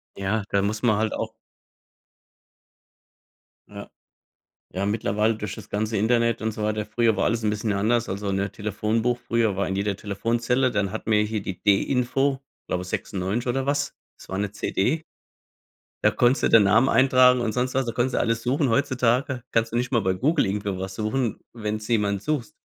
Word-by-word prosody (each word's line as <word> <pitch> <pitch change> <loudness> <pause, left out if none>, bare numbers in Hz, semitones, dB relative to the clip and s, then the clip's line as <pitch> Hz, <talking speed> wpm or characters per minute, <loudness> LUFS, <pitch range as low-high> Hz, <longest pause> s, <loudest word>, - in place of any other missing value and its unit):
Ja, 100 +2 -1
da 100 - +2
muss 105 +2 -2
man 110 -4 +3
halt 110 0 0
auch 110 0 -3 2.4
Ja. - - -9 0.8
Ja, 95 +2 -2
mittlerweile 105 +1 +1
durch 105 -1 -5
das - - -11
ganze 110 +1 -1
Internet 115 +2 +2
und 110 0 -1
so 105 0 -5
weiter. 105 0 -1
Früher 110 0 +1
war - - 0
alles 115 0 0
'n 105 - +2
bisschen 105 0 -1
anders. 115 +4 +1
Also, 100 +1 -3
ne, 100 +1 -1
Telefonbuch 110 +3 -1
früher 115 -4 0
war 100 0 -1
in 95 - -2
jeder 100 0 -1
Telefonzelle. 120 +6 0
Dann 100 -3 -1
hatten 110 0 -4
wir 105 0 +4
hier 105 -1 -2
die 95 -2 -6
D-Info, 130 +6 +1 0.3
glaube, 90 0 -2
96 95 +4 -3
oder 135 +2 0
was? 145 0 -1 0.2
Das - - -15
war 95 - -3
'ne 100 0 -2
CD. 120 +8 -1 1.0
Da - - +5
konntest 120 +2 +2
du - - +3
den 110 -3 +7
Namen 110 +7 +4
eintragen 130 0 +5
und 110 -2 -1
sonst 125 +1 -1
was. 135 -1 +1
Da - - 0
konntest 125 +2 -1
du - - +2
alles 115 0 0
suchen. 135 +2 +1
Heutzutage 125 0 +1
kannst 115 0 +1
du - - -4
nicht 125 +2 -1
mal 120 -3 +2
bei 95 0 +1
Google 145 - +1
irgendwo 100 -1 -2
was 95 0 -5
suchen, 110 +2 -1
wenn 110 -2 -3
du 105 - -9
jemanden 105 -4 +1
suchst. 140 -1 -2
110 Hz, 190 wpm, -24 LUFS, 105-120 Hz, 2.4 s, den